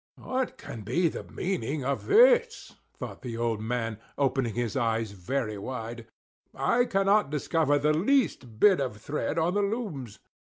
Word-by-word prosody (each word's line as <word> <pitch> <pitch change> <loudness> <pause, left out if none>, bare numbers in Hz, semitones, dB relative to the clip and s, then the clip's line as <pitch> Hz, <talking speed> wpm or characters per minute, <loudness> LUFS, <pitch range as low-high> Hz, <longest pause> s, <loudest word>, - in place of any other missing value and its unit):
"What 260 0 -3
can 115 - -8
be 165 - +1
the - - -6
meaning 155 -7 -3
of 140 0 -2
this?" 475 +2 +4 0.2
thought - - -7
the 120 -4 -5
old 115 -2 -1
man, 115 -1 -2 0.2
opening 135 -5 0
his 120 -2 -2
eyes 115 -4 0
very 105 +3 -3
wide. 115 0 -6 0.5
"I 245 +1 +2
cannot 195 - +2
discover 150 0 +1
the 150 +2 +2
least 160 - +1
bit 200 -3 +6
of 125 -6 -3
thread 145 +10 -3
on 165 +2 +2
the 205 - +2
looms." 200 - -3
140 Hz, 155 wpm, -28 LUFS, -, 0.5 s, bit